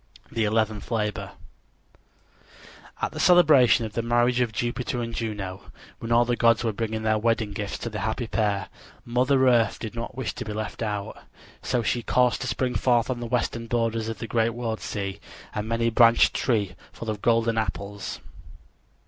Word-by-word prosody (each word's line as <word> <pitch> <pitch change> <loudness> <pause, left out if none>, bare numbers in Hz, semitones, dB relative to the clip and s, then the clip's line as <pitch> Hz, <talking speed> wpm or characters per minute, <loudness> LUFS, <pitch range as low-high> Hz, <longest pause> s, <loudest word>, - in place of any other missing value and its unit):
THE 115 -2 0
ELEVENTH 110 0 0
LABOR 105 -3 -2 1.7
At - - 0
the - - -7
celebration 150 -10 +6
of 110 - -7
the 115 - -1
marriage 120 +1 +2
of 120 -3 +1
Jupiter 120 +2 -2
and 115 -1 -4
Juno, 105 -5 -5 0.3
when 115 - -5
all 120 +1 +5
the 120 0 0
gods 115 -1 +3
were 115 -2 0
bringing 110 +1 -3
their 110 0 +2
wedding 115 -1 0
gifts 100 0 -4
to 115 - -5
the 105 - -4
happy 110 +5 -2
pair, 105 -3 -1 0.4
Mother 130 +2 +2
Earth 115 -4 +3
did 110 -1 -6
not 115 0 -6
wish 130 -4 -2
to - - -5
be 105 - -5
left 110 +2 -5
out. 105 -3 -3 0.4
So 120 - 0
she 120 +2 0
caused 125 0 +2
to - - -3
spring 125 -1 -1
forth 120 +2 +2
on 125 - -3
the 120 - -4
western 115 -1 -1
borders 115 -1 0
of 115 - -4
the - - -5
great 115 0 0
world 115 -2 -3
sea 100 -2 -4 0.3
a 105 - -2
many 115 +2 0
branched 115 0 +5
tree 105 -7 0 0.2
full 115 -1 -5
of 105 -2 -6
golden 115 -1 +2
apples. 100 -1 -4
115 Hz, 180 wpm, -25 LUFS, 110-120 Hz, 1.7 s, celebration